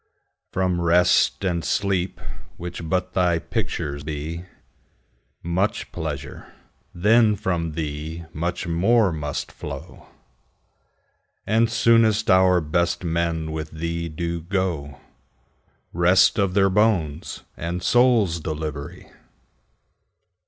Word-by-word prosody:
From 90 -2 0
Rest 90 +3 +3
and 85 -3 0
Sleep, 95 +3 -1 0.4
which 85 -1 -6
but 90 0 -1
thy 90 -3 +2
picture 70 -2 -3
be, 75 +2 -4
5 90 - -9 1.0
Much 95 +5 -1
pleasure, 70 -6 -6 0.4
then 105 +4 +4
from 85 -6 -2
thee 80 +2 -5
much 85 +3 -3
more 95 +5 +3
must 75 -3 -4
flow; - - -9 1.4
And 115 +2 +2
soonest 115 -2 +3
our 95 -1 +5
best 85 +4 0
men 85 -1 -1
with 80 -1 -4
thee 85 +1 -4
do 85 +1 -3
go— 85 -7 -2 0.9
Rest 90 +5 +4
of 95 -2 +1
their 95 -1 +4
bones 95 -8 0
and 85 +2 -4
souls' 120 -9 +3
delivery! 80 +2 -5
85 Hz, 105 wpm, -23 LUFS, 80-95 Hz, 1.4 s, our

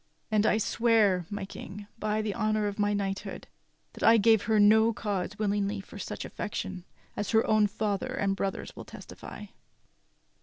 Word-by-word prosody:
And 215 0 +3
I - - +3
swear, 215 -6 +2
my 205 -1 -4
King, 205 +1 -9
by 215 0 0
the 210 -2 -2
honor 215 0 0
of 205 0 -3
my 205 0 +2
knighthood, 195 -1 -3 0.5
that - - -12
I 225 +1 +7
gave 225 0 +5
her 215 0 +3
no 220 +2 +6
cause 205 -2 -3
willingly 205 -1 0
for 200 +1 -10
such - - -5
affection, 190 -3 -5 0.3
as 205 - -3
her 225 -1 +3
own 215 -1 +4
father 210 +4 -2
and 195 -6 0
brothers 195 0 -4
will - - -8
testify." - - -10
210 Hz, 165 wpm, -29 LUFS, 200-215 Hz, 0.5 s, I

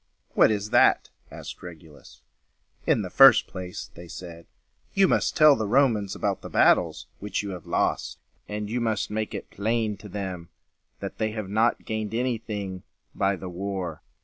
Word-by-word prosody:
"What - - +5
is 105 0 -2
that?" - - +4 0.2
asked - - -9
Regulus. 80 -4 -13 0.6
"In 110 - +3
the 90 - -6
first 135 +3 +8
place," 90 -1 -7
they 85 +1 -11
said, 85 -1 -10 0.5
"you 195 -1 +5
must - - +1
tell 155 -2 +7
the 110 -3 -2
Romans 115 -5 +2
about - - -2
the - - -8
battles - - +3
which 105 0 -3
you 100 - -5
have 90 -3 -8
lost, - - -1 0.3
and 105 0 -4
you 120 +3 -2
must 110 -3 -1
make 110 0 -3
it 100 - -7
plain 110 0 -1
to 105 - -11
them 95 -4 -5 0.5
that - - -6
they 110 -1 -1
have 110 -4 -5
not 110 +3 +1
gained 110 0 -3
any 125 -1 0
thing 100 -5 -5 0.3
by 100 0 +1
the 95 0 -8
war. 95 0 -4
105 Hz, 175 wpm, -26 LUFS, 95-110 Hz, 0.6 s, first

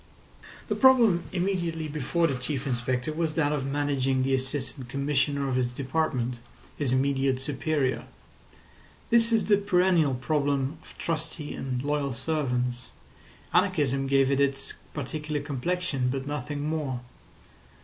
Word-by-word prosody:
The - - 0
problem 240 -9 +5
immediately 175 -4 -1
before 155 +3 0
the 145 - +1
Chief 130 +2 -3
Inspector 125 +2 -1
was 160 -1 -1
that 150 -3 +2
of 140 -3 -1
managing 135 -2 +1
the 135 +1 +1
Assistant 130 -1 -3
Commissioner 140 +1 0
of 130 -1 0
his 125 -1 +2
department, 125 -2 -1 0.4
his 140 -4 -1
immediate 135 0 +2
superior. 140 0 -1 1.1
This 230 0 +5
is 225 -1 +3
the 205 -1 +5
perennial 180 -7 +3
problem 140 +2 0
of - - -16
trusty 160 -2 -3
and 130 -1 -3
loyal 145 -2 0
servants; 125 -4 -1 0.7
anarchism 135 -7 +2
gave 135 0 +3
it 135 - +2
its 135 -1 0 0.2
particular 150 +1 -3
complexion, 145 -1 -1
but 135 +1 -2
nothing 145 +1 -3
more. 145 -6 -2
140 Hz, 130 wpm, -27 LUFS, 130-155 Hz, 1.1 s, problem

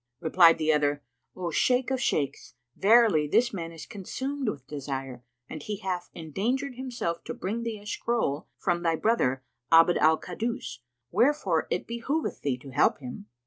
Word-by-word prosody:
Replied 165 0 +6
the 155 -1 +2
other, 145 -1 +1 0.3
"O 175 -2 -3
Shaykh 250 +8 +2
of 260 -1 0
Shaykhs, 140 - -1 0.2
verily 210 -8 +5
this 240 +11 +2
man 165 -4 -4
is 165 -2 -9
consumed 260 +5 -4
with 140 -9 -6
desire 135 -3 -5 0.2
and 155 - -7
he 210 +6 -4
hath 185 -2 -4
endangered 230 - -2
himself 245 -10 -4
to - - -5
bring 215 +5 -3
thee 230 -2 -3
a 205 - -15
scroll 210 -9 -1
from 175 -2 0
thy 165 -1 +1
brother 135 - +1 0.3
Abd 165 +2 +6
al 160 +1 +5
Kaddus; 230 - -4 0.3
wherefore 205 - +2
it 180 - -1
behoveth 245 +7 -3
thee 135 -3 -1
to 135 +1 -12
help 145 - +3
him." 125 -6 -9
175 Hz, 165 wpm, -27 LUFS, 150-235 Hz, 0.3 s, Replied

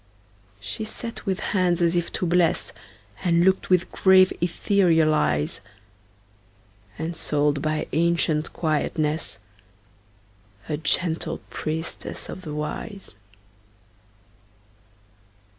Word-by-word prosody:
She 165 - -4
sat 225 +1 -6
with 190 0 0
hands 180 -3 +2
as 170 0 +2
if 175 -1 0
to - - -1
bless, 175 0 +2 0.5
And 170 -1 +3
looked 190 0 +2
with 180 -2 +2
grave, 190 -1 +5
ethereal 170 -3 +3
eyes; 75 - 0 1.4
Ensouled 150 -3 0
by 155 0 -1
ancient 160 -1 +1
quietness, 155 -1 -1 1.3
A 150 - -1
gentle 160 +2 0
priestess 160 +1 -4
of - - -7
the 150 -4 -6
Wise. 150 - -5
165 Hz, 90 wpm, -24 LUFS, 155-180 Hz, 1.4 s, grave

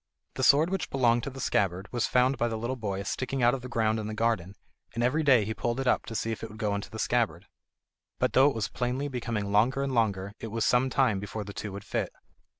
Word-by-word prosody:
The - - -4
sword 145 +6 +5
which 195 -3 -2
belonged 120 -3 +3
to - - -3
the 135 0 -10
scabbard 95 -5 0
was 120 -2 0
found 125 +1 +2
by 120 - +2
the 115 -1 -3
little 120 +4 -2
boy 100 -5 -3
sticking 130 +4 -2
out 120 +1 +5
of 135 - -3
the 125 - -8
ground 110 -2 +1
in 105 - -4
the 110 - -4
garden, 110 -5 0 0.4
and 120 - 0
every 125 +6 +2
day 130 -8 +5
he 110 - -2
pulled 120 +3 -2
it 135 - -2
up 125 - +1
to 115 - -6
see 115 - -1
if 110 - -5
it 115 - -6
would 110 - -11
go 105 -1 -1
into 100 0 -4
the 110 - -8
scabbard. 120 0 0 0.7
But - - 0
though 135 +2 +6
it 140 - -5
was 110 -2 -1
plainly 130 +3 -2
becoming 115 -5 -3
longer 120 +7 +3
and 135 -1 -2
longer, 100 -4 0
it - - -5
was 115 +1 -1
some 125 +2 +3
time 125 -7 +2
before 105 +2 -5
the 100 0 -9
two 105 - -5
would 100 +1 -7
fit. - - -2
115 Hz, 260 wpm, -28 LUFS, 105-130 Hz, 0.7 s, though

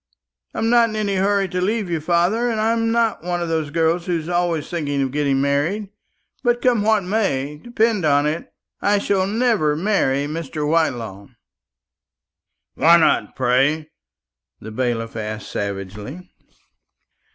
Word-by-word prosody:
I - - -6
am 225 +1 +1
not 235 -1 +5
in 215 - -6
any 205 -2 -1
hurry 195 +1 +2
to 180 0 -2
leave 210 +2 0
you, 170 -2 -1
father, 180 +9 +1
and 225 -2 -1
I'm 225 +1 +1
not 230 -6 +1
one 175 0 -2
of 170 -1 -3
those 160 -2 -1
girls 165 +3 0
who 165 -3 -1
are 175 - -3
always 175 -3 0
thinking 145 -5 -2
of 135 - -2
getting 140 -1 +1
married; 145 +9 0 0.5
but 240 -1 +2
come 240 -3 +2
what 215 -1 +2
may, 150 -8 -1
depend 230 -4 +1
upon 145 -1 +3
it, 155 +3 -3 0.3
I 205 0 +3
shall 195 -1 +1
never 215 -9 +1
marry 150 -7 +1
Mr. 150 -1 -4
Whitelaw." 120 -11 -1 1.5
"Why 165 +3 +6
not, 165 - +2
pray?" 135 +5 +1 0.7
the 110 - -9
bailiff 115 -1 -2
asked 110 -1 -5
savagely. 105 - -6
170 Hz, 150 wpm, -21 LUFS, 140-205 Hz, 1.5 s, Why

